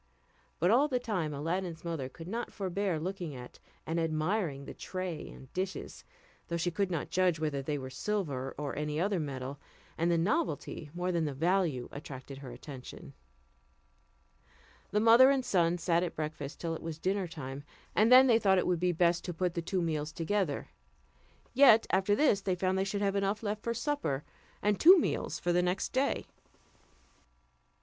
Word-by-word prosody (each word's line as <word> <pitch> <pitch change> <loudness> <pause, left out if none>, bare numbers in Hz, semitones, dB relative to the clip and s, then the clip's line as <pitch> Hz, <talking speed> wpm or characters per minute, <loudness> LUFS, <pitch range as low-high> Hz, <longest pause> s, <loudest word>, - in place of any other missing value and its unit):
But 175 +4 +3
all 265 +6 +5
the 260 -4 0
time 195 -11 -2
Aladdin's 165 +3 -3
mother 160 -6 -3
could 165 +5 -11
not 230 +5 -4
forbear 190 -3 -2
looking 175 -3 -4
at 125 -1 -10 0.3
and 165 +1 -1
admiring 160 -2 -1
the - - -7
tray 185 -4 -5
and 130 - -13
dishes, 190 +1 -4 0.4
though 170 - -2
she 175 +1 0
could 200 +2 0
not 165 -5 -3
judge 180 -3 +2
whether 150 -3 -1
they 145 +2 -2
were 130 -1 -7
silver 140 -6 -2
or 145 -1 -4
any 150 0 -2
other 195 +1 +1
metal, 135 -2 -5 0.4
and 170 +1 +2
the 170 - +3
novelty 185 - -1
more 180 +1 -1
than 170 -2 0
the 145 -2 -3
value 165 -4 +1
attracted 135 -1 -8
her 135 -2 -8
attention. 125 +1 -10 1.8
The 210 - +1
mother 230 +4 +7
and 270 -2 +1
son 175 -2 +2
sat 170 0 +1
at 175 -2 -3
breakfast 150 -2 -5
till 165 -1 -2
it 160 - -6
was 160 -1 -5
dinner 190 +2 -1
time, 140 -4 -7 0.3
and 220 +3 +4
then 255 +1 +10
they 235 -3 +5
thought 195 -3 +4
it 180 - +2
would 180 -2 +1
be 180 +1 +2
best 170 0 +2
to 175 - -4
put 180 0 0
the 170 - -2
two 180 +2 -1
meals 155 -2 -2
together; 170 -2 -1 0.8
yet, 240 -5 +7
after 195 +2 +3
this 215 -7 +3
they 190 -1 0
found 185 +1 0
they 190 - +1
should 200 +1 -2
have 200 0 +1
enough 200 +2 0
left 210 0 -2
for 235 +1 -2
supper, 285 - -1 0.4
and 210 -1 +2
two 365 +4 +9
meals - - -1
for 175 - 0
the 180 - +3
next 180 +2 -1
day. 270 +2 0
175 Hz, 185 wpm, -31 LUFS, 155-200 Hz, 1.8 s, then